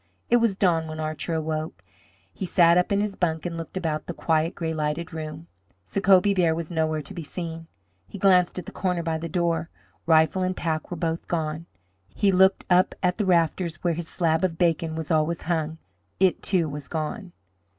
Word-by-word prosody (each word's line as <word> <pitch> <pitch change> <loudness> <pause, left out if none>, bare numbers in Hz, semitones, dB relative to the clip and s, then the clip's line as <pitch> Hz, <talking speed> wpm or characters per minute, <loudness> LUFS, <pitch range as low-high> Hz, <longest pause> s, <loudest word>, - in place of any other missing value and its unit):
It 240 - +7
was 230 -4 +2
dawn 170 -5 +2
when 155 0 -6
Archer 155 +2 -3
awoke. 155 - -3 0.5
He 190 - -4
sat 170 -2 +5
up 180 +2 +2
in 200 0 +2
his 210 -1 -1
bunk 160 -2 -1
and 170 -1 -3
looked 165 +2 -6
about 160 -4 -2
the 175 - -5
quiet, 160 0 0
gray 165 -1 -2
lighted 155 +3 -2
room. 155 0 -6 0.4
Sacobie 195 - +4
Bear 170 -3 +3
was 165 0 -5
nowhere 160 -2 0
to 140 - -8
be 170 - -6
seen. 165 +1 -6 0.4
He - - -9
glanced 185 -2 +4
at 180 - -5
the - - -8
corner 180 -3 -1
by 160 -1 -1
the 165 +1 -5
door. 170 -1 0 0.4
Rifle 160 +3 +4
and 185 0 -1
pack 160 -2 -2
were 175 - -5
both 165 0 -2
gone. 160 0 -2 0.5
He 200 - +3
looked 190 +1 +4
up 180 0 +3
at 180 0 +2
the 210 -3 -1
rafter 170 0 +2 0.2
where 175 -1 +2
his 165 0 -4
slab 165 0 0
of 170 -3 0
bacon 165 -2 +1
was 160 -1 -4
always 160 +1 +1
hung. 160 -2 -1 0.4
It, 190 -1 +3
too, 180 -5 +1
was 145 -1 -7
gone. 170 +4 -4
165 Hz, 200 wpm, -25 LUFS, 160-180 Hz, 0.5 s, It